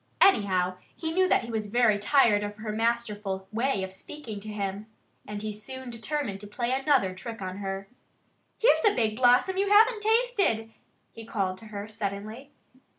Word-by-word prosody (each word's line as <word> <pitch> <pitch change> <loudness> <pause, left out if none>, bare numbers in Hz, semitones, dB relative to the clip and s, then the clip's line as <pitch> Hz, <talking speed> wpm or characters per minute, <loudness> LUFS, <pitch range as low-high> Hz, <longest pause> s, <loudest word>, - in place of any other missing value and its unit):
Anyhow, 185 - +3 0.2
he 320 -1 -3
knew 370 +2 +2
that - - +3
he 235 - -7
was 215 -2 -3
very 225 -2 +3
tired 210 -2 +4
of 205 0 -4
her 215 0 -5
masterful 210 -4 -1
way 230 -2 0
of 190 0 -6
speaking 225 0 -8
to 215 +2 -8
him. 200 0 -4 0.4
And 210 0 -5
he 215 -1 -3
soon 255 +4 -8
determined 230 -3 -3
to 205 - -9
play 240 +4 -2
another 265 -8 +2
trick 225 +4 -8
on 185 -1 -5
her. 195 -1 -4 0.7
"Here's 475 - +4
a 425 - +4
big 220 -3 +1
blossom 250 +10 +4
you 395 +1 +1
haven't 435 +2 +5
tasted!" 425 - +1 0.4
he 225 - -10
called 190 -4 -2
to 225 - -12
her 205 -1 -6
suddenly. 215 +4 -5
220 Hz, 175 wpm, -27 LUFS, 205-265 Hz, 0.7 s, haven't